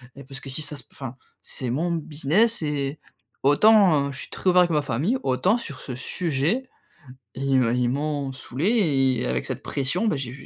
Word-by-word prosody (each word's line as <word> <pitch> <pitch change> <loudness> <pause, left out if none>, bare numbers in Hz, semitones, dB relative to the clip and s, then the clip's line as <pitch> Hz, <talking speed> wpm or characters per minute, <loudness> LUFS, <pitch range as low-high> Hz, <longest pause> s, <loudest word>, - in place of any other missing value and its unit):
et 140 - -10
parce 135 0 -9
que 135 - -10
si 145 +4 -3
ça 150 0 -3
se 140 - -7
p - - -35
enfin, 130 -2 -7 0.3
c'est 130 - -4
mon 165 +7 0
business 165 +8 +1
et, 145 -1 -2 0.4
autant 155 -2 +5
je 135 - -7
suis - - -6
très 185 - 0
ouvert 180 0 +6
avec 175 -1 +2
ma 150 -1 +2
famille, 160 - 0
autant 130 - +2
sur 140 - -7
ce 125 - -6
sujet, 170 - -1 0.7
ils 135 0 +2
me 120 -1 +2
ils 125 -1 +1
m'ont 145 0 -2
saoulé 135 - +1
et - - -2
avec 60 0 -1
cette - - -5
pression, 165 +11 -1
ben, 150 - +1
j'ai 125 -3 -4
j' 140 - -12
140 Hz, 205 wpm, -24 LUFS, 130-175 Hz, 0.7 s, ouvert